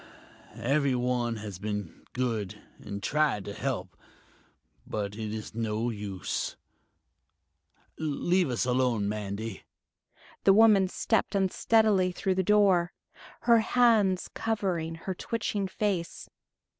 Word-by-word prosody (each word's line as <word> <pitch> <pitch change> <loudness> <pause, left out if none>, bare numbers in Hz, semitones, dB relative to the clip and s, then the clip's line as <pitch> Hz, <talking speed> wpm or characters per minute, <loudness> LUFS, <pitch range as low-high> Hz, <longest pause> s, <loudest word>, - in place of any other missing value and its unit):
Everyone 125 -3 +1
has 105 -4 -7
been 105 -4 -5
good 110 -5 -2 0.2
and 100 0 -7
tried 150 -9 +1
to 100 - -5
help, - - -3 0.9
but 100 -2 -3
it 110 -1 -4
is 110 0 -6
no 115 +1 -1
use.... 100 -4 -4 1.4
Leave 160 +3 +1
us 120 0 0
alone, 125 -5 +1
Mandy." 105 0 -4 0.8
The 195 - +6
woman 210 -3 +6
stepped 220 +3 0
unsteadily 195 0 +3
through 190 +1 -1
the 190 - +1
door, 190 -3 +3 0.5
her 235 -1 +5
hands 220 -5 +3
covering 185 -7 -1
her 185 +3 -5
twitching 205 0 -2
face. 185 -3 -2
145 Hz, 105 wpm, -28 LUFS, -, 1.4 s, The